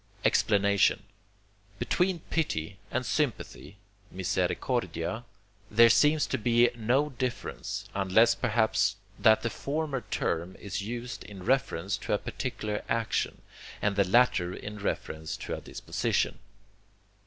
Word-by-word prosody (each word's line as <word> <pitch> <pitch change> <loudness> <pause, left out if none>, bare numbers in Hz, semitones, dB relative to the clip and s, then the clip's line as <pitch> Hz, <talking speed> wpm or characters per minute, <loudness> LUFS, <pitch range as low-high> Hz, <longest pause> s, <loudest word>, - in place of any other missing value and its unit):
Explanation 100 0 +3 0.7
Between 180 - 0
pity 100 - -1
and 125 0 -2
sympathy 125 -7 -2 0.3
(misericordia) 110 +4 -1 0.4
there 115 +2 +7
seems 150 +6 +4
to 130 - -2
be 120 +2 +4
no 125 +6 +1
difference, 130 -2 -4
unless 100 +4 +4
perhaps 110 -2 +1 0.2
that 110 0 +5
the 115 - -1
former 145 -2 -2
term 85 +3 -1
is 100 -1 -5
used 120 +3 -5
in 95 -3 -10
reference 105 -7 +1
to - - -3
a - - +4
particular 105 -3 -4
action, 115 -1 -1 0.4
and 100 -1 0
the 100 - +4
latter 95 -3 +3
in 105 0 -7
reference 80 -5 -3
to - - -5
a - - -8
disposition. - - -1
115 Hz, 120 wpm, -29 LUFS, 100-125 Hz, 0.7 s, there